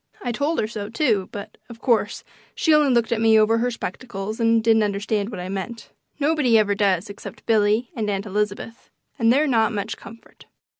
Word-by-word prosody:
I 245 - -1
told 285 +7 -1
her - - +1
so, 215 -2 -6
too; 220 -6 0
but, 200 - -9
of 235 -1 -11
course, 235 -3 0 0.3
she 320 - +2
only 300 -3 +4
looked 235 -2 +1
at 225 -1 0
me 225 -1 +5
over 225 +1 +3
her 245 +2 +1
spectacles 215 -1 -6
and 230 -1 +3
didn't 225 -1 +4
understand 205 0 -1
what 210 -6 -7
I 180 - -5
meant. 195 +5 -6 0.3
Nobody 290 -6 +3
ever 205 -2 +3
does 200 -2 +1
except 205 0 -10
Billy 220 +1 +2
and 215 -3 -2
Aunt 200 0 -2
Elizabeth, 210 +2 -4 0.3
and 230 -1 +4
they're 285 +5 +3
not 230 -5 +2
much 200 -1 -3
comfort. 230 0 -15
225 Hz, 195 wpm, -22 LUFS, 205-235 Hz, 0.3 s, me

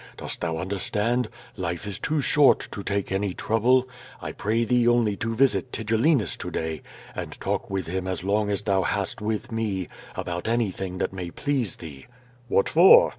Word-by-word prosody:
Dost - - -4
thou 80 -1 -1
understand? 105 +6 0 0.3
Life 85 +2 -3
is 100 -2 -5
too 155 -1 0
short 145 0 +4
to 100 - -5
take 100 -1 -2
any 95 -1 -1
trouble. 125 +4 +3 0.3
I - - -5
pray 110 +3 0
thee 120 +1 +3
only 120 -4 +3
to 115 0 -2
visit 130 0 +2
Tigellinus 115 - +1
to - - -5
day 80 -1 -3 0.3
and - - -6
talk - - -2
with 95 -3 -2
him 95 +2 -3
as 90 -2 -3
long 105 +2 +1
as 100 0 -1
thou 95 -1 +2
hast 100 +2 -1
with 110 +3 -2
me, 105 -5 -2 0.3
about 90 +2 -4
anything 95 -5 -1
that - - -1
may 90 -2 -5
please 130 -1 -1
thee." 70 -5 -10 0.4
"Wliat 100 - +3
for?" 190 - +8
105 Hz, 175 wpm, -25 LUFS, 95-120 Hz, 0.4 s, for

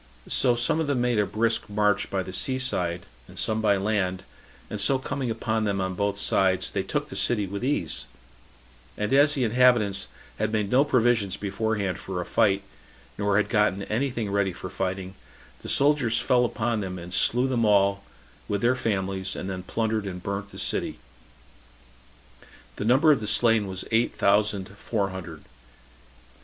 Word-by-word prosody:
So 125 -2 +3
some 120 +6 +1
of 160 - -1
them 140 -3 0
made 120 -2 +1
a 105 - +1
brisk 115 0 0
march 105 -1 +1
by 95 -1 -1
the 95 - -8
sea 130 +5 +1
side, 90 -9 -1 0.2
and - - -14
some 110 0 0
by 100 -2 +3
land, 95 -2 -1 0.4
and 105 - -4
so 135 +6 +4
coming 130 -1 -4
upon 110 -1 -1
them 100 -2 -1
on 95 0 -2
both 100 +1 -1
sides, 95 -2 +1
they - - -1
took - - -3
the - - -8
city 105 -4 +2
with 100 +3 -6
ease; 85 - -1 0.9
and 105 +3 -1
as 145 +2 +5
the 135 - 0
inhabitants 115 -4 +3 0.3
had 110 0 0
made 105 -2 -1
no 130 +3 +5
provision 120 -7 +2
beforehand 100 -2 -2
for 95 -2 -5
a 90 - -3
flight, 100 -2 +2 0.5
nor 100 -1 +1
had 105 - +2
gotten 105 -3 +1
any 125 +8 -1
thing 115 -5 -4
ready 100 -2 0
for 95 - -8
fighting, 95 0 -3 0.5
the - - -8
soldiers 140 -5 +2
fell 125 0 +2
upon 115 -1 -1
them, 95 -2 -4
and 90 0 -9
slew 120 +8 +3
them 125 -3 0
all, 100 -2 +3 0.4
with 100 -1 -2
their 120 +2 +3
families, 95 -4 -2
and 95 - -5
then 95 -1 -5
plundered 110 +1 -2
and 90 -2 -7
burnt 100 0 -4
the - - -12
city. - - -1 1.8
The - - -3
number 135 +7 +5
of 145 - +3
the 105 - -5
slain 115 -1 +3
was 95 0 -4
eight 115 +1 +1
thousand 100 -1 +2
four 100 -4 -2
hundred. 85 -5 -8
105 Hz, 180 wpm, -25 LUFS, 95-120 Hz, 1.8 s, as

